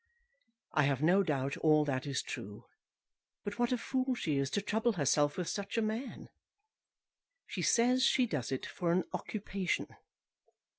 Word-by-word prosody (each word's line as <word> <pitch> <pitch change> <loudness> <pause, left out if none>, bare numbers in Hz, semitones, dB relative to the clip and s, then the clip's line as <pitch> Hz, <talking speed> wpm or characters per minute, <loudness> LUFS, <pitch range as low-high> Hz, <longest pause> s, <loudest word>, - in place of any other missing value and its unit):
I 150 - +4
have 140 0 0
no 180 +5 +5
doubt 140 -6 -1
all 155 -1 +4
that 130 -1 -2
is 140 -2 -1
true; 100 +1 -7 0.8
but 205 +3 -5
what 240 0 +2
a 250 - +2
fool 260 +1 -1
she 150 -11 -1
is 135 -1 0
to 205 - 0
trouble 220 +3 +1
herself 145 -3 +2
with 180 -2 -2
such 200 +2 -3
a - - +3
man. 220 +5 -4 1.2
She - - -5
says 250 +2 +3
she 260 -1 +4
does 135 - -3
it 130 - -2
for 170 -2 -2
an 180 +1 +2
occupation. 195 -4 -3
180 Hz, 160 wpm, -33 LUFS, 145-225 Hz, 1.2 s, no